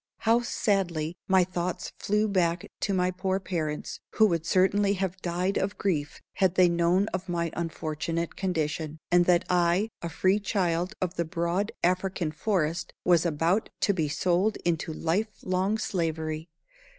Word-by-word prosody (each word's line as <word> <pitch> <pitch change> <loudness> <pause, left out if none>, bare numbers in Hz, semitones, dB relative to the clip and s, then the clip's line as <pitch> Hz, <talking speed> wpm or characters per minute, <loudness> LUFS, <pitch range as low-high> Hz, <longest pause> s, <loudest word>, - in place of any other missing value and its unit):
How 230 +2 +4
sadly 180 -8 0
my 190 -1 +5
thoughts 180 0 -3
flew 210 +1 +1
back 180 -1 +1
to 200 - -1
my 180 -1 +2
poor 190 +1 -1
parents, 160 -6 -3
who 220 - +5
would 165 -2 -1
certainly 195 +2 +3
have 190 -1 -3
died 180 +2 -1
of 195 +2 -2
grief 155 -7 -2
had 190 -2 +2
they 185 -1 +6
known 170 +3 +2
of 185 0 -3
my 170 -2 -1
unfortunate 165 0 -3
condition, 160 -4 -2
and 175 0 +5
that 175 -1 +3
I, 180 +4 +2
a 170 - -3
free 185 +5 +2
child 180 -4 -1
of 180 0 -3
the 170 - 0
broad 170 +4 -1
African 180 -2 0
forest, 165 -1 -1
was 175 -1 +4
about 170 +6 +1
to 200 - +3
be 160 -5 0
sold 180 +7 +1
into 165 -1 0
life 170 +7 0
long 185 +3 +1
slavery! 160 -4 -2
180 Hz, 155 wpm, -27 LUFS, 165-190 Hz, -, they